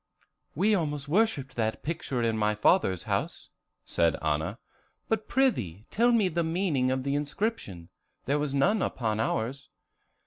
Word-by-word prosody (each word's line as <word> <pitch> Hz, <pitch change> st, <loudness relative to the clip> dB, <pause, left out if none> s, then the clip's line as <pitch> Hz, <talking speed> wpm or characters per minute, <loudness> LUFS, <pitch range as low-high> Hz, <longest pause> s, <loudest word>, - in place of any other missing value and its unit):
] -, -, -54 dB
"We 200 Hz, +8 st, +3 dB
almost 150 Hz, -6 st, -1 dB
worshipped 150 Hz, -, +1 dB
that 110 Hz, -1 st, -1 dB
picture 140 Hz, -6 st, -2 dB
in 115 Hz, -1 st, +1 dB
my 105 Hz, -1 st, +1 dB
father's 105 Hz, -, +2 dB
house," -, -, -3 dB, 0.3 s
said 85 Hz, -3 st, +2 dB
Anna; 75 Hz, +1 st, -1 dB, 0.5 s
"but 220 Hz, -1 st, -1 dB
prithee 115 Hz, -, 0 dB
tell 240 Hz, +3 st, +3 dB
me 225 Hz, -5 st, +3 dB
the 170 Hz, -1 st, 0 dB
meaning 160 Hz, -6 st, 0 dB
of 130 Hz, 0 st, -1 dB
the 140 Hz, +1 st, -1 dB
inscription; 145 Hz, -, -3 dB, 0.4 s
there 145 Hz, +2 st, +1 dB
was 145 Hz, -2 st, -2 dB
none 195 Hz, +10 st, +3 dB
upon 110 Hz, -4 st, -1 dB
ours." 115 Hz, +4 st, -2 dB
140 Hz, 150 wpm, -28 LUFS, -, 0.5 s, We